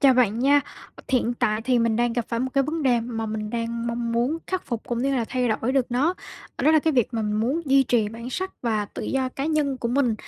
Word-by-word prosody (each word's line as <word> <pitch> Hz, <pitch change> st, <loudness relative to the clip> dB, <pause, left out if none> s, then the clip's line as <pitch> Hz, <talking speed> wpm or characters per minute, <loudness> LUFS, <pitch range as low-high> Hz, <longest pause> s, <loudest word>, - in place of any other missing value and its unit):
chào 270 Hz, -2 st, +6 dB
bạn 230 Hz, -3 st, +3 dB
nha. 280 Hz, +3 st, +5 dB, 0.5 s
Thiện 245 Hz, -2 st, +1 dB
tại 225 Hz, -3 st, 0 dB
thì 250 Hz, +1 st, +2 dB
mình 230 Hz, -1 st, +2 dB
đang 240 Hz, 0 st, +1 dB
gặp 240 Hz, -1 st, -1 dB
phải 230 Hz, 0 st, -1 dB
một 260 Hz, -, 0 dB
cái 275 Hz, -, +4 dB
vấn 315 Hz, +3 st, -2 dB
đề 245 Hz, -4 st, +3 dB
mà 225 Hz, -1 st, -4 dB
mình 215 Hz, -1 st, -4 dB
đang 235 Hz, 0 st, -3 dB
mong 235 Hz, 0 st, -2 dB
muốn 245 Hz, +7 st, +1 dB
khắc 370 Hz, -1 st, -3 dB
phục 235 Hz, -3 st, -3 dB
cũng 240 Hz, -, -2 dB
như 275 Hz, +1 st, +1 dB
là 235 Hz, -, 0 dB
thay 250 Hz, -1 st, 0 dB
đổi 225 Hz, +3 st, 0 dB
được 265 Hz, -2 st, +2 dB
nó, 280 Hz, +9 st, +2 dB, 0.4 s
ờ, -, -, -3 dB
đó 305 Hz, -, +6 dB
là 315 Hz, -, +6 dB
cái 315 Hz, +1 st, +1 dB
việc 245 Hz, -6 st, +2 dB
mà 225 Hz, -, 0 dB
mình 210 Hz, 0 st, 0 dB
muốn 265 Hz, +9 st, 0 dB
duy 275 Hz, -1 st, +5 dB
trì 235 Hz, -4 st, +1 dB
bản 230 Hz, +3 st, -8 dB
sắc 375 Hz, +8 st, -3 dB
và 220 Hz, -3 st, 0 dB
tự -, -, -8 dB
do 265 Hz, -1 st, 0 dB
cá 270 Hz, +2 st, -5 dB
nhân 300 Hz, -4 st, +1 dB
của 235 Hz, -, -2 dB
mình. 245 Hz, -2 st, +2 dB
245 Hz, 275 wpm, -24 LUFS, 230-270 Hz, 0.5 s, chào